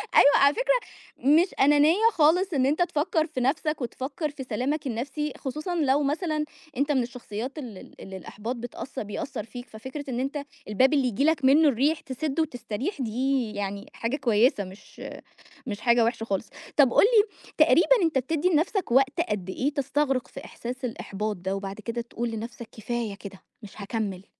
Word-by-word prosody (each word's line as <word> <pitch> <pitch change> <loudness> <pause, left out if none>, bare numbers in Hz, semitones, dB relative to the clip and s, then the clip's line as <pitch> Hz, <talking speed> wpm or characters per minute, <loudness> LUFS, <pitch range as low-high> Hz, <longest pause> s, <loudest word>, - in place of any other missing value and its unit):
أيوه، 285 - +7
على 280 +1 +5
فكرة، - - +2 0.4
مش 305 +8 +4
أنانية 295 +4 +5 0.2
خالص 345 +4 +3
إن 265 -3 +2
أنت 295 +6 +1
تفكر 320 -1 +1
في 305 -5 -4
نفسك، 300 +3 0
وتفكر 270 +5 -3
في 285 -2 -8
سلامك 265 +5 -2
النفسي، 270 +5 -3
خصوصًا 305 +6 -4
لو 290 -3 +2
مثلًا 305 +1 -1 0.3
أنت 285 +3 +1
من 265 -4 +2
الشخصيات 240 +2 -6
ال 240 -9 -7
ال - - -14
اللي 190 0 -8
الإحباط 215 +6 -6
بتأث 245 +2 -7
بيأثر 215 +3 -4
فيك، 245 +3 -9
ففكرة 260 +6 -7
إن 245 -1 -2
أنت 275 +3 -2 0.3
الباب 255 +7 +3
اللي 280 -3 +3
ييجي 250 +3 0
لك 310 -4 +2
منّه 300 +4 +6
الريح، 285 +6 +1
تسده 285 +3 -2
وتستريح، 265 - -4
دي 250 0 0
يعني 200 0 -4
حاجة 230 +4 -2
كويّسة، 235 -4 +3
مش 190 +2 -13 0.7
مش 210 -4 -4
حاجة 235 0 +4
وِحشة 225 -1 -1
خالص. 200 0 -3 0.3
طَب 270 -5 +5
قُل - - +6
لي، 430 -2 +5 0.3
تقريبًا - - +5
أنت 325 -5 +2
بتدّي 310 +6 0
لنفسك 345 - +1
وقت 270 +5 +3
قد 190 - -3
إيه 280 +9 -1
تستغرق 275 -2 0
في - - -10
إحساس 250 +2 -7
الإحباط 210 -3 -3
ده، 190 +2 -3
وبعد 195 +1 -6
كده 230 +2 -3
تقول 235 0 -4
لنفسك: 225 +1 -6
كفاية 230 -1 -3
كده، 200 -2 -10 0.2
مش 210 +1 -11
هاكمل؟ 200 -2 -3
260 Hz, 175 wpm, -26 LUFS, 225-295 Hz, 0.7 s, أيوه